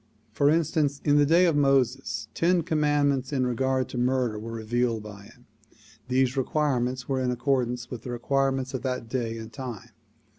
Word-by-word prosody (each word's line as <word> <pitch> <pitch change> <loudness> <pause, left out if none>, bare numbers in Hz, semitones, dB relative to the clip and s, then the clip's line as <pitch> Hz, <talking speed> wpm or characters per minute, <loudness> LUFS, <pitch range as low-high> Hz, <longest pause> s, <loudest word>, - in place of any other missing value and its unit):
For 140 +6 +2
instance, 155 -3 +1
in 145 0 +4
the 145 -1 +4
day 170 +4 +5
of 165 -3 +2
Moses 135 -6 +1
ten 175 0 +2
commandments 145 -4 +1
in 130 -3 +1
regard 130 +1 0
to 125 - -4
murder 125 -3 0
were 115 +2 -7
revealed 115 0 -1
by 100 -1 -10
him. 120 +4 -19 0.6
These 130 0 +2
commandments 130 -3 -1
were 135 -1 0
in 125 - 0
accordance 125 -2 -1
with 120 -3 -6
the 125 - -8
require 135 +3 +1
ments 130 0 -4
of 130 - -3
that 125 -3 -3
day 115 -2 -2
and 110 0 -9
time. 120 -4 -7
130 Hz, 180 wpm, -26 LUFS, 120-140 Hz, 0.6 s, day